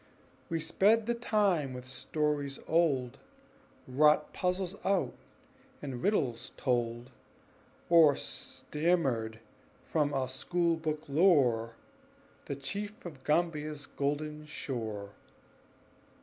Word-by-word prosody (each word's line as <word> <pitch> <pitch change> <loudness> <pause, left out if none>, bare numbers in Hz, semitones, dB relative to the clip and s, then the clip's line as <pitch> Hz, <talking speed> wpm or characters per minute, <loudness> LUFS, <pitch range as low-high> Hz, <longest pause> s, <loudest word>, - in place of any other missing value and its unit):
We 165 - 0
sped 200 +7 +3
the 235 - +1
time 200 - +1
with 125 0 -7
stories 140 +2 -2
old, 140 -7 +2 0.7
Wrought 150 +3 +4
puzzles 180 +1 -1
out, 195 -1 +1 0.7
and 130 -4 -5
riddles 130 - 0
told, 120 0 -1 0.8
Or 165 -4 +7
stammered 135 -9 -1 0.4
from 150 -3 0
our 135 -2 0
school 170 +6 0
book 155 -1 -3
lore 135 -8 +3 0.7
The 140 - -3
Chief 200 +11 -6
of 145 -7 -9
Gambia's 150 -2 0
"golden 150 +2 -3
shore." 110 -9 -5
150 Hz, 95 wpm, -31 LUFS, 130-170 Hz, 0.8 s, Or